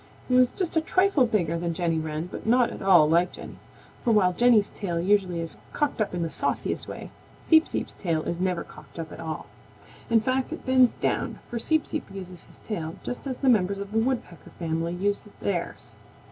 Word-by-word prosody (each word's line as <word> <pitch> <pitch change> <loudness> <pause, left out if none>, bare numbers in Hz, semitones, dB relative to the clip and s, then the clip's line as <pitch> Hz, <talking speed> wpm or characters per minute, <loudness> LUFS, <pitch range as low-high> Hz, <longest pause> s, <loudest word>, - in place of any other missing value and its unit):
He 255 - -1
was 250 -1 +6
just 355 +1 -3
a 320 - +4
trifle 370 -5 +3
bigger 170 -7 0
than 170 -1 -2
Jenny 165 -2 0
Wren 155 +1 -3
but - - -7
not 245 +1 +4
at - - -8
all 180 -6 +6
like 170 +3 +3
Jenny, - - -10 0.4
for 235 - +2
while 190 -5 +4
Jenny's 230 0 +4
tail 175 -5 -3
usually 185 -2 +2
is 165 - -6 0.2
cocked 295 -6 0
up 205 - -1
in 175 - -1
the 165 - -2
sauciest - - -2
way, - - -8 0.3
Seep 320 0 +5
Seep's - - -4
tail 165 -4 -1
is 170 - -3
never 180 -2 0
cocked - - -15
up 160 -2 -5
at - - -9
all. 160 -1 -5 0.6
In 230 -1 +5
fact, 255 +3 -1
it - - -7
bends 260 -2 +5
down, - - -1
for 235 - -4
Seep 315 +6 +1
Seep 310 - -4
uses 185 -3 -8
his - - -19
tail 165 -6 -5
just 250 - -5
as 260 -2 -3
the 275 - -1
members 200 -5 +3
of 200 0 -6
the 220 - +2
Woodpecker 235 -7 -2
family 165 0 -2
use 200 +3 -1
theirs. 175 -4 -3
195 Hz, 210 wpm, -26 LUFS, 170-245 Hz, 0.6 s, was